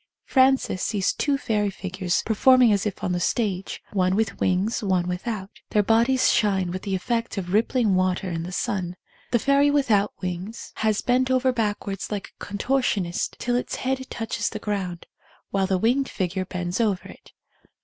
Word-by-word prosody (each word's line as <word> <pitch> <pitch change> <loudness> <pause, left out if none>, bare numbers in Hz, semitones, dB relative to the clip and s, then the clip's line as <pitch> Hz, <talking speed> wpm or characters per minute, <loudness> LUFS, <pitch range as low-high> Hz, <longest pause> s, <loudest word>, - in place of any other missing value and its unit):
Frances 260 -8 +3
sees 200 -4 0
two 285 -2 0
fairy 210 -6 0
figures 185 -2 -2
performing 245 +1 +5
as 200 +1 +1
if 200 - -6
on 180 - 0
the 175 - 0
stage, 195 0 -1
one 185 -1 +2
with 215 -1 -1
wings, 190 +4 +1
one 185 -4 +1
without. 190 +2 -4 0.2
Their 210 - +3
bodies 235 +5 +3
shine 190 -4 +1
with 185 +1 -4
the 195 -2 -2
effect 230 +4 -2
of 180 -1 -3
rippling 225 0 +2
water 185 0 +1
in 165 -2 -3
the 175 +2 -6
sun. 180 -1 -2 0.3
The 240 - +3
fairy 280 +4 +3
without 230 -9 +2
wings 185 +5 -5
has 215 -1 +1
bent 255 +1 +2
over 260 0 +2
backwards 205 -4 -2
like 205 -2 -4
a - - -14
contortionist 205 -4 -1
till 245 0 -1
its 245 - -1
head 260 0 -2
touches 225 -1 -2
the 215 - -5
ground, 195 -5 -3 0.5
while 195 -1 +1
the 190 - +1
winged 250 +7 +1
figure 185 -1 -2
bends 180 +2 -2
over 205 -5 0
it. - - -15
205 Hz, 175 wpm, -24 LUFS, 185-235 Hz, 0.5 s, performing